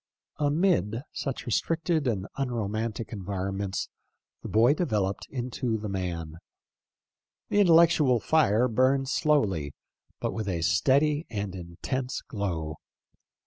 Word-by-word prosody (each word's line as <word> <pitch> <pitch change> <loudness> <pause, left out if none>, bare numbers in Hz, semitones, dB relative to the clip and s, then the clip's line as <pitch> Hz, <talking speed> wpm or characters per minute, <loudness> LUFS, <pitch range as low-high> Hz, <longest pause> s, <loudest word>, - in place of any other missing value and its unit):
Amid 145 - +1
such 135 -2 -4
restricted 160 +5 0
and 100 -6 -1
unromantic 115 -3 -3
environ 95 -1 -3
ments 100 -1 -2 0.5
the - - -7
boy 115 +5 +5
developed 105 - -1
into 125 -2 -2
the 105 -1 -5
man. 85 -4 -4 1.1
The - - 0
intel 175 -5 +7
lectual 155 -7 +4
fire 125 -4 +3
burned 130 +3 +2
slowly, 100 - +1 0.5
but - - -2
with 110 -3 -3
a 85 -3 -1
steady 145 - +2
and 100 -3 -4
intense 95 +9 -4
glow. 85 -8 -3
115 Hz, 115 wpm, -27 LUFS, 95-140 Hz, 1.1 s, intel